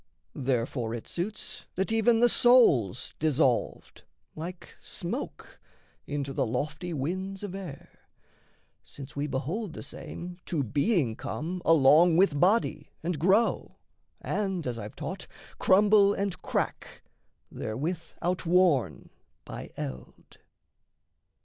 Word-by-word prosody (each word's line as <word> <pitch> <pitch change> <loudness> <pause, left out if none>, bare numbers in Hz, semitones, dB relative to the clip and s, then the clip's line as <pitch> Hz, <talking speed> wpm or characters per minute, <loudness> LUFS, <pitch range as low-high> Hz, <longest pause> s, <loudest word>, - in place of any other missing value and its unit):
Therefore 125 -3 -1
it 115 - -8
suits 195 +5 -4
that 190 +4 -1
even 225 +1 +3
the 240 - +7
soul's 130 - +4
dissolved, 145 -5 0 0.3
Like 170 +3 -8
smoke, - - -6 0.5
into 140 -1 -3
the 130 - 0
lofty 150 +9 -3
winds 185 +7 -3
of 200 -3 -5
air; 180 -8 -9 0.8
Since 135 -2 -11
we 145 +1 -1
behold 160 - -3
the - - -7
same 175 +1 -8
to 160 -6 0
being 140 - +1
come 160 - -4
Along 160 +2 +6
with 175 -6 +3
body 180 -5 +2
and 170 -2 -2
grow, 195 +8 +2 0.5
and, 190 -5 -2
as 120 -2 -3
I've 105 0 -8
taught, - - -6 0.3
Crumble 205 +1 +5
and 195 -4 -3
crack, - - -3 0.5
therewith 150 +11 -3 0.2
outworn 175 -5 +2 0.3
by - - -7
eld. 65 -2 -8
165 Hz, 110 wpm, -28 LUFS, 135-190 Hz, 0.8 s, the